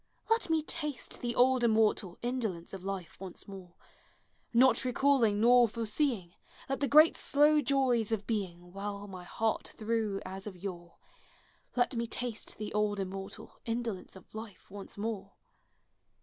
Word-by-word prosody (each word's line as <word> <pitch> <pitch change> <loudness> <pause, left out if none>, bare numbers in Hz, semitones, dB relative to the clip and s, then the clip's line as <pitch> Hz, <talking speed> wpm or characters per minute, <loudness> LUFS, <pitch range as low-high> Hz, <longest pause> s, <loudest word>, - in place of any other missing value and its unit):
Let 450 -5 +3
me 320 -1 +2
taste 300 -4 -4
the 240 -1 -2
old 255 0 +4
immortal' 215 -5 +2
Indolence 220 -10 -2
of 190 -2 -7
life 190 -4 -5
once 190 -2 -7
more; 190 -3 -10 0.8
Not 255 +3 +5
recalling 250 -4 +3
nor 240 +1 +6
foreseeing, 225 - -1 0.3
I^et 270 - -2
the 280 - +1
great 310 +3 +7
slow 295 +1 +4
joys 255 -5 +2
of 210 -3 -1
being 180 -5 -3
Well 200 +1 -5
my 185 -2 -9
heart 225 +3 -1
through 220 -2 -1
as 190 +2 -6
of 190 -3 -7
yore! 175 -2 -7 0.8
Let 245 +1 +2
me 235 0 -1
taste 240 -1 -4
the 215 -1 -5
old 210 -1 +1
immortal 195 +2 -6
Indolence 230 -6 -3
of 190 - -15
life 220 -3 -9
once 200 0 -8
more! 200 -2 -4
220 Hz, 150 wpm, -31 LUFS, 195-245 Hz, 0.8 s, great